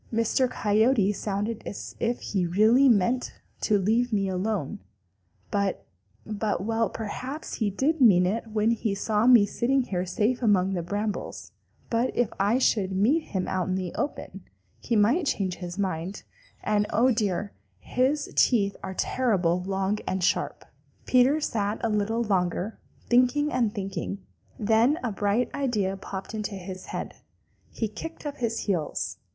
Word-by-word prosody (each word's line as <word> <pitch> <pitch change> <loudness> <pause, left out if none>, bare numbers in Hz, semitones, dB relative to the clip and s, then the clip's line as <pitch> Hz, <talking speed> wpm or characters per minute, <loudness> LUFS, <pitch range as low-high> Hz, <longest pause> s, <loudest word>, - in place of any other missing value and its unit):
Mr. 230 +3 +1
Coyote 215 -1 +2
sounded 205 +3 -3
as - - -7
if 235 +1 -1
he 185 -4 -1
really 220 +9 +5
meant 235 +3 +2 0.3
to 210 - +2
leave 225 +5 +1
me 200 -2 +1
alone, 190 -4 -2 0.7
but, 200 -2 -1 0.4
but 210 -2 -2
well, 225 +1 0
perhaps 255 +7 -6
he 215 -3 +1
did 280 +10 0
mean 185 -7 +6
it 220 +5 -1
when 220 +1 +1
he 220 -3 -1
saw 215 +2 +1
me 240 -5 +8
sitting 260 +6 +1
here 180 -6 -2
safe 220 +7 0
among 195 -4 +3
the 175 - -1
brambles, 205 +4 -4 0.4
but 235 +2 +2
if 240 -3 +1
I 205 +5 +3
should 205 -7 +2
meet 250 - +2
him 190 -2 -3
out 185 -1 -1
in 185 - 0
the 185 -2 -3
open, 295 - -4 0.4
he 235 - -1
might 245 - +3
change 185 -6 -1
his 175 0 -7
mind 185 -1 -3 0.4
and 210 0 +1
oh, 250 +4 +3
dear, 205 -3 -1 0.2
his 260 - -1
teeth 200 -5 +3
are 190 0 -6
terrible 185 -10 +1
long 195 +2 -1
and 185 -1 -1
sharp!" - - 0 0.4
Peter 255 +4 +4
sat 215 -7 -1
a 230 - +1
little 215 +3 0
longer, 190 0 -1 0.3
thinking 255 +5 +3
and 235 -4 +2
thinking. 195 0 -4 0.3
Then 225 +7 +3
a 240 - -1
bright 205 +4 0
idea 215 -9 0
popped 195 +1 -7
into 210 -2 -3
his 185 0 -8
head. - - -5 0.5
He 225 - -2
kicked 325 +10 -8
up 290 -1 -4
his 230 -2 -1
heels. 175 -7 -2
210 Hz, 155 wpm, -26 LUFS, 195-240 Hz, 0.7 s, me